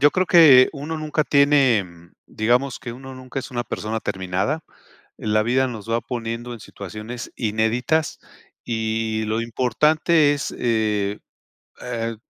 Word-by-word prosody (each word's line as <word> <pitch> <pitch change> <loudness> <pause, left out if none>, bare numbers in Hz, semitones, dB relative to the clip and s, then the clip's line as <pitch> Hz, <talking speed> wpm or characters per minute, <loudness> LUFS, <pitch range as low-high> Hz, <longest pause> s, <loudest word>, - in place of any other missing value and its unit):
yo 145 +1 +6
creo 185 0 0
que 150 -8 +8
uno 150 +3 -5
nunca 155 0 -1
tiene, 140 -7 +4
mm, 85 -1 -17
digamos 120 +4 0
que 120 -3 -6
uno 130 +2 -10
nunca 130 +1 -7
es 135 - -6
una 120 -1 -2
persona 110 -1 -4
terminada. 95 - -2 0.6
La 110 0 +1
vida 130 +3 +2
nos 115 -3 -8
va 115 +1 +1
poniendo 120 0 -5
en 115 - -9
situaciones 110 +5 -8
inéditas 115 +7 0 0.5
y 110 -1 -1
lo 110 +1 -1
importante 145 +6 +2
es, 145 - -4
eh 105 -3 0 0.6
eh, 115 -2 -3
120 Hz, 140 wpm, -22 LUFS, 110-135 Hz, 0.6 s, que